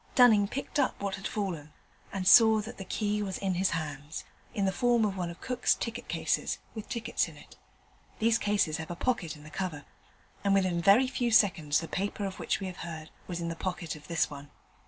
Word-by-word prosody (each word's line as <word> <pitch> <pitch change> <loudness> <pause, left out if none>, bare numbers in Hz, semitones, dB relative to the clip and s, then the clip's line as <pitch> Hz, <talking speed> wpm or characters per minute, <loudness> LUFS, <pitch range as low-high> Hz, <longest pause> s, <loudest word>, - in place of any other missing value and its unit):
Dunning 220 -5 +6
picked 275 +6 -3
up 265 - +1
what 200 -1 -2
had 195 +1 -4
fallen, 175 -8 -3 0.4
and 190 -2 -2
saw 220 +1 +8
that 230 +2 -9
the - - -4
key 210 +2 -1
was 195 -2 -3
in 195 -1 -1
his 185 +2 +2
hands 150 -1 -4 0.3
in 200 - 0
the 190 - +2
form 240 +3 +3
of 200 -2 -1
one 180 -2 -2
of 170 - -10
Cook's 250 -1 +1
ticket 230 - -5
cases, - - 0 0.2
with 220 -2 -7
tickets 230 -1 -1
in - - -12
it. - - -15 0.6
These 225 +1 +3
cases 205 -7 +1
have 160 0 -6
a 175 - -4
pocket 180 -7 -1
in 150 - -14
the 155 - -12
cover, 170 -6 -4 0.6
and 200 -1 +3
within 185 -3 +2
very 200 +8 +6
few 250 -2 -1
seconds 180 -9 +4
the 165 - -6
paper 200 +3 -2
of 190 -1 -5
which - - 0
we 195 - -4
have 185 -1 -6
heard 160 -2 -7 0.2
was 175 -2 -4
in 170 - -2
the 165 - -4
pocket 175 -3 -3
of 150 0 -13
this 165 -1 +1
one. 145 0 -10
190 Hz, 220 wpm, -30 LUFS, 165-215 Hz, 0.6 s, saw